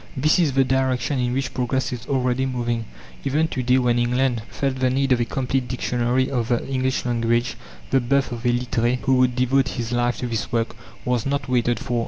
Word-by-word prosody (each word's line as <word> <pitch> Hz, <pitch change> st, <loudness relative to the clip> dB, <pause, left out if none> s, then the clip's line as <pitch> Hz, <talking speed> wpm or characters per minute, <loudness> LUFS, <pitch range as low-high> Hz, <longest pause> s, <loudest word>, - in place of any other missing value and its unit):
This 155 Hz, +4 st, +3 dB
is 155 Hz, -6 st, +2 dB
the 135 Hz, 0 st, +4 dB
direction 130 Hz, 0 st, 0 dB
in 125 Hz, -1 st, 0 dB
which 135 Hz, +1 st, -2 dB
progress 125 Hz, +1 st, -1 dB
is 120 Hz, -, -7 dB
already 130 Hz, -1 st, +1 dB
moving. 120 Hz, -3 st, -2 dB, 0.4 s
Even 150 Hz, +4 st, +1 dB
to 130 Hz, -, -2 dB
day, 125 Hz, +1 st, +3 dB
when 120 Hz, -2 st, +2 dB
England 125 Hz, 0 st, +1 dB
felt 135 Hz, -2 st, -2 dB
the 130 Hz, 0 st, +2 dB
need 135 Hz, +1 st, 0 dB
of 125 Hz, -, +4 dB
a 120 Hz, -, +1 dB
complete 130 Hz, 0 st, -1 dB
dictionary 125 Hz, +1 st, 0 dB
of 120 Hz, -4 st, -1 dB
the 120 Hz, -1 st, 0 dB
English 130 Hz, -1 st, -1 dB
language, 120 Hz, 0 st, +1 dB, 0.4 s
the 135 Hz, -, +4 dB
birth 135 Hz, +2 st, +1 dB
of 120 Hz, -1 st, -5 dB
a -, -, 0 dB
Littré, 120 Hz, 0 st, +1 dB
who 135 Hz, -, +2 dB
would 125 Hz, -1 st, +3 dB
devote 130 Hz, +2 st, +2 dB
his 120 Hz, -4 st, -4 dB
life 120 Hz, 0 st, +1 dB
to -, -, -3 dB
this 115 Hz, -2 st, -3 dB
work, 115 Hz, -1 st, -1 dB, 0.3 s
was 125 Hz, -1 st, 0 dB
not 140 Hz, +1 st, -1 dB
waited 120 Hz, -1 st, +1 dB
for. 120 Hz, -1 st, -2 dB
125 Hz, 215 wpm, -23 LUFS, 120-130 Hz, 0.4 s, the